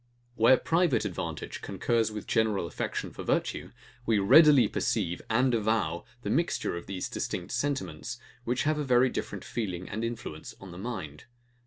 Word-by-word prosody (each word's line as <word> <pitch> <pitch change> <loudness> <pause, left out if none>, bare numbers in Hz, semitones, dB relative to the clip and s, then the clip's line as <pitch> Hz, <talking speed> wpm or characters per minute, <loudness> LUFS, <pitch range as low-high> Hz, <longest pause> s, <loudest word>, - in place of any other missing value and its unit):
Where 120 +2 +6
private 165 -2 +2
advantage - - -4
concurs 110 +3 0
with 105 -2 -6
general 110 -5 +1
affection - - -4
for - - -8
virtue, - - -1 0.3
we 115 -2 +2
readily 135 +4 +7
perceive 90 -7 -1
and 125 +3 +3
avow 105 -7 0 0.2
the - - -2
mixture 170 - 0
of 85 - -7
these 95 -1 -3
distinct 90 - -4
sentiments, 125 -1 -2 0.3
which 125 +1 0
have 150 0 +1
a - - 0
very 125 -1 +4
different - - -5
feeling 105 -8 -4
and 110 +3 -4
influence 115 -9 -5
on 95 -2 -10
the 85 - -9
mind. 95 -10 -6
115 Hz, 160 wpm, -29 LUFS, 95-125 Hz, 0.3 s, readily